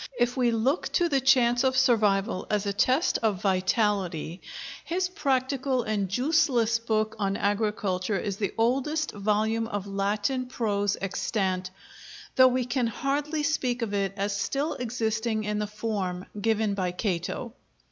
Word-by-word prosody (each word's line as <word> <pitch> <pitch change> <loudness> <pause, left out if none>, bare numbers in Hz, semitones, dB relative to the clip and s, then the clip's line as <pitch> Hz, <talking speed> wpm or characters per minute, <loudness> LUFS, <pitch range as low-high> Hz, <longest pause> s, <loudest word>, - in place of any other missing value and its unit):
If 240 0 +1
we 250 -2 +2
look 235 +8 0
to 345 - +3
the 275 -3 +2
chance 245 -2 +4
of 260 0 +2
survival 210 -7 +2
as 210 -1 0
a 200 - -1
test 260 - +2
of 215 -5 +1
vitality, 190 -3 0 0.4
his 360 +2 -1
practical 265 -5 0
and 205 -4 -1
juiceless 250 - +2
book 220 -1 0
on 195 -1 0
Agriculture 205 -2 0
is 200 0 -3
the 200 -2 -1
oldest 275 +7 +1
volume 215 +2 0
of 205 -4 -4
Latin 205 +6 -1
prose 205 -5 0
extant; 190 -1 -1 0.7
though 260 0 +8
we 255 -1 +1
can 245 -1 0
hardly 290 +6 -1
speak 255 -5 0
of 210 -3 -3
it 195 -1 0
as 200 +1 -1
still 275 +9 -1
existing 220 -2 -1
in 210 0 -1
the 210 - -1
form 205 -4 -3 0.2
given 220 -1 +1
it - - -2
by 180 -2 0
Cato. 190 +4 -3
220 Hz, 150 wpm, -27 LUFS, 200-255 Hz, 0.7 s, though